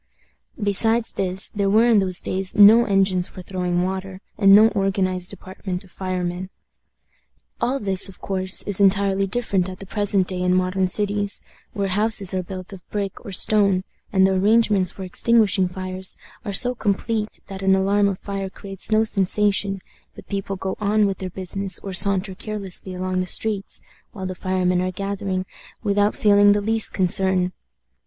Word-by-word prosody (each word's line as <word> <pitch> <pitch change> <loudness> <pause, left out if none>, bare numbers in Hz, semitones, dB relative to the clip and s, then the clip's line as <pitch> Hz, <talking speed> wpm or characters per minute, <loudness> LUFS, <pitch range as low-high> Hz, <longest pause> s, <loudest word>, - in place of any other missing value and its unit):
Besides 225 +3 +2
this, 190 0 0
there 200 -2 -1
were 220 +4 +4
in 230 -3 +4
those 185 -2 0
days 190 0 0
no 215 +3 +7
engines 195 -3 +1
for 185 - -11
throwing 180 -1 -2
water, 190 0 -4 0.2
and 195 -2 +4
no 215 +2 +7
organized 190 -3 -1
department 185 0 -6
of 190 - -19
firemen. 185 -1 -4 1.1
All 260 +3 0
this, 195 -3 +2
of 190 - -15
course, 190 0 0
is 205 -1 0
entirely 195 0 +2
different 195 -4 -1
at 185 - -8
the 195 - -10
present 200 -2 0
day 185 -1 -3
in 180 0 +2
modern 185 +1 0
cities, 205 +1 0 0.3
where 200 -2 -2
houses 205 -1 0
are 185 - -1
built 185 +2 -8
of 190 - -10
brick 200 -2 -4
or 200 - -8
stone, 195 -1 +3 0.3
and 190 -1 +4
the 190 - +2
arrangements 205 -1 +2
for 190 - -9
extinguishing 200 0 +2
fires 185 +1 -4 0.3
are 205 - -4
so 245 +5 +6
complete 215 0 -2
that 195 -1 -9
an 190 0 +3
alarm 200 +1 +2
of 195 -2 -2
fire 195 -1 -5
creates 195 +1 -5
no 215 0 +4
sensation, 200 -1 0 0.3
but - - -12
people 195 -1 -4
go 190 0 -4
on 210 0 +2
with 195 -1 -2
their 185 - -5
business 190 +1 -3
or 195 - -6
saunter 195 +1 +3
carelessly 195 -2 -4
along 185 0 -2
the 185 - -2
streets, 205 0 -1 0.3
while 190 -3 -6
the 185 - -4
firemen 185 -1 0
are 185 0 -2
gathering, 195 -1 -3 0.4
without 205 0 +1
feeling 205 -1 +5
the 205 - 0
least 220 +1 +1
concern. 185 0 +1
195 Hz, 170 wpm, -22 LUFS, 185-205 Hz, 1.1 s, no